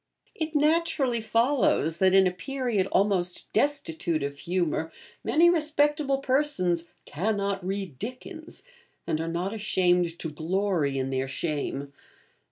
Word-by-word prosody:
It 315 -1 -4
naturally 295 -5 +2
follows 230 - +2
that, 190 +1 +4
in 190 0 +6
a 185 - +2
period 240 -1 -2
almost 185 -3 0
destitute 170 - 0
of 140 0 -3
humour, 165 0 -1 0.3
many 330 +3 +4
respectable 295 -4 +2
persons 255 - 0 0.2
'cannot 200 +3 -1
read 190 -7 -4
Dickens,' 315 - -8 0.4
and 160 -2 -1
are 165 - -3
not 175 +4 -2
ashamed 180 -5 +1
to 160 - -4
glory 165 -2 0
in 135 0 -2
their 130 0 -1
shame. 140 -1 -3
190 Hz, 125 wpm, -27 LUFS, 165-270 Hz, 0.4 s, in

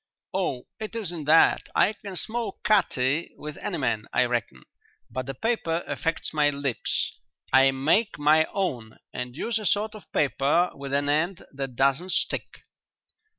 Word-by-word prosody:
"Oh, 125 - -1 0.2
it 220 +1 -6
isn't 175 -9 -3
that. 160 +2 +5
I 210 - +4
can 200 -2 -9
smoke 230 0 -3
cutty 165 -7 +2
with 150 0 -7
any 200 -5 -3
man, 115 -6 -1
I - - +3
reckon, 120 - -3 0.5
but 130 +2 -4
the 135 - -4
paper 175 - -1
affects 165 0 -2
my 150 -1 +4
lips. 140 -4 -1 0.4
I 135 0 +7
make 155 +12 +2
my 155 +2 +4
own 125 - -3 0.2
and 125 0 -5
use 225 +8 -1
a 215 - -6
sort 210 +3 +1
of 215 - -13
paper 145 +6 +2
with 140 0 -7
an 140 +1 +1
end 160 +5 0
that 135 -2 -5
doesn't 140 +8 +2
stick." - - -1
150 Hz, 155 wpm, -26 LUFS, 135-190 Hz, 0.5 s, I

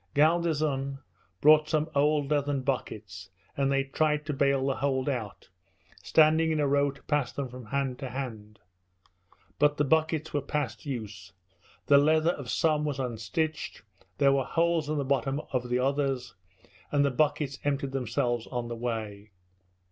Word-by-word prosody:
Galdeazun 150 -3 +1 0.4
brought 155 +1 +6
some 155 -1 +1
old 145 0 +2
leathern 145 -2 +1
buckets, 105 -8 -4 0.3
and 140 0 +1
they 135 0 +2
tried 150 +2 0
to 150 - -2
bale 140 -1 +2
the 135 -1 0
hold 135 -1 0
out, 120 -8 -4 0.5
standing 160 +1 +4
in 155 -1 0
a 145 - +2
row 140 +1 +3
to 140 0 -12
pass 145 -5 0
them 140 -2 -4
from 125 -2 -10
hand 135 0 -2
to 135 -2 -5
hand; 110 -6 -6 1.0
but 145 0 +3
the 150 - +2
buckets 160 +1 +1
were 145 - +1
past 135 -3 -3
use, 105 -7 -6 0.5
the 140 -1 +6
leather 155 +3 +3
of 140 -7 -7
some 155 -2 +1
was 145 -3 -2
unstitched, 125 +1 -3 0.3
there 140 -1 +4
were 135 -1 +2
holes 165 0 0
in 155 - -1
the 140 - -1
bottoms 135 +1 0
of 125 -1 -1
the 125 - +1
others, 135 -1 -1 0.6
and 145 -1 +3
the 140 - +1
buckets 140 0 0
emptied 140 -1 -1
themselves 120 -2 -1
on 120 -2 -4
the 120 - -4
way. 110 -3 -4
140 Hz, 165 wpm, -28 LUFS, 125-150 Hz, 1.0 s, brought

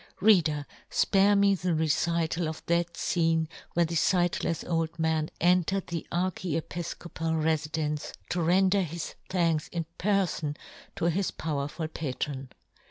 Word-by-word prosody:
Reader, 165 -8 +4 0.2
fpare 200 +1 +4
me 200 0 +5
the 180 -3 0
recital 165 +1 +1
of 160 - -8
that 170 0 +1
fcene 165 -2 +1 0.3
where 170 0 +3
the 165 - -5
fightlefs 175 0 +1
old 165 -1 -1
man 160 -1 +1
entered 180 +2 +2
the 170 -2 -5
archiepifcopal 170 -2 -2
re 160 0 +4
fidence 150 -1 -3 0.2
to 180 - 0
render 190 +4 +4
his 170 -2 -4 0.2
thanks 165 -4 +1
in 170 -2 -3
per 195 +1 +3
fon 150 -3 -4 0.4
to - - -2
his 195 +3 0
powerful 150 +1 -3
patron. 135 -3 -4
165 Hz, 135 wpm, -28 LUFS, 160-180 Hz, 0.4 s, me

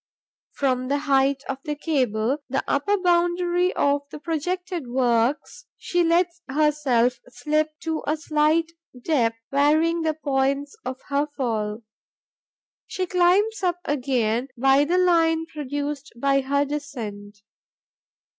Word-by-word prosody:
From 255 -2 0
the 280 +2 +1
height 275 -1 +1
of 270 0 -4
the 300 - -3
cable, 260 -4 0
the 270 - -1
upper 405 +9 +1
boundary 350 0 +2
of 285 0 +2
the - - -8
projected 345 0 -3
works, 245 - 0
she 350 0 0
lets 345 +1 +1
herself 270 -5 +2
slip 305 +4 -1
to 320 -1 -2
a 310 - +1
slight 310 +2 +1 0.3
depth, 240 -5 +1
varying 310 +4 +3
the 315 -1 0
points 280 -1 -1
of 255 +1 -5
her 285 +1 +1
fall. 220 -4 -2 1.0
She 370 - -2
climbs 370 +5 +2
up 355 -2 0
again 250 -4 0
by 270 +3 +4
the 350 +4 +1
line 330 -3 +3
produced 290 -1 -5
by 275 +2 +2
her 280 +2 +1
descent. 230 -9 -6
290 Hz, 125 wpm, -24 LUFS, 265-330 Hz, 1.0 s, by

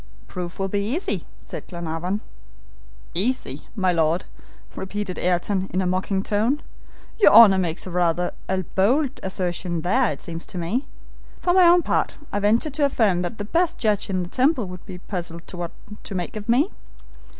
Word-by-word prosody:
"Proof 180 -1 -6
will 195 - -1
be 200 +1 -1
easy," 245 - -2
said - - -8
Glenarvan. 175 +3 -3 0.9
"Easy, 195 - -1
my 185 -4 +2
Lord," 165 +1 +1 0.5
repeated 190 -1 -4
Ayrton, 185 +2 0
in 185 - 0
a 190 - +1
mocking 190 +2 0
tone. 225 +9 +1 0.6
"Your 415 - +7
honor 205 -4 +9
makes 170 -2 -2
rather 175 -1 +1 0.2
a 190 0 0
bold 260 +8 +2
assertion 180 -2 -2
there, 230 +8 +2
it - - -6
seems 165 -2 -7
to - - -7
me. 185 - -1 0.5
For 350 - +2
my 365 -1 +7
own 345 0 +6
part, - - 0 0.2
I 205 - 0
venture 225 +9 +2
to 285 +1 +1
affirm 215 -10 +2
that 180 +5 -4
the 205 - -4
best 345 - +1
judge 210 -4 +1
in 185 -2 0
the 175 - -7
Temple 260 - +2
would 180 -1 -9
be 180 - -7
puzzled 175 -3 -5
what 175 -1 -4 0.4
to 200 - -5
make 175 +2 -3
of 215 +1 -7
me. 275 - +3
190 Hz, 170 wpm, -23 LUFS, 180-230 Hz, 0.9 s, honor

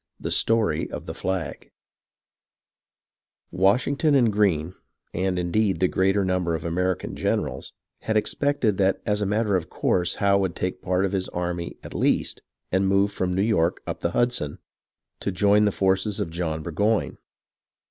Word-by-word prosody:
THE - - -4
STORY 110 -9 +2
OF - - -7
THE - - -5
FLAG 90 -8 -4 1.8
Washington' 125 - +2
and 120 -5 +3
Greene, 90 -5 +1 0.4
and, 95 +1 -1
indeed, 95 +3 +1
the 95 - +3
greater 95 +2 +1
number 90 -2 0
of 80 - -5
the 85 - -2
American 90 +1 -1
generals, - - -2 0.3
had 110 -1 0
expected 120 -2 +1
that 95 0 +2
as 105 0 0
a 100 - 0
matter 105 0 +1
of 80 -4 -2
course 90 -1 0
Howe 100 0 +3
would 95 -4 -1
take 90 0 -3
a - - -24
part 90 +1 +1
of 95 - -2
his 95 -2 -2
army, 85 -1 -4
at - - -9
least, - - 0 0.3
and 95 +1 +2
move 100 +1 +3
from 90 -3 -2
New 95 - +2
York 95 -6 +1
up - - -4
the - - -1
Hudson, 120 -9 0 0.6
to - - -2
join 105 +2 +3
the 105 - +2
forces 95 +1 0
of 80 - -2
John 80 -2 -3
Burgoyne. 105 +7 0
95 Hz, 170 wpm, -24 LUFS, 90-105 Hz, 1.8 s, and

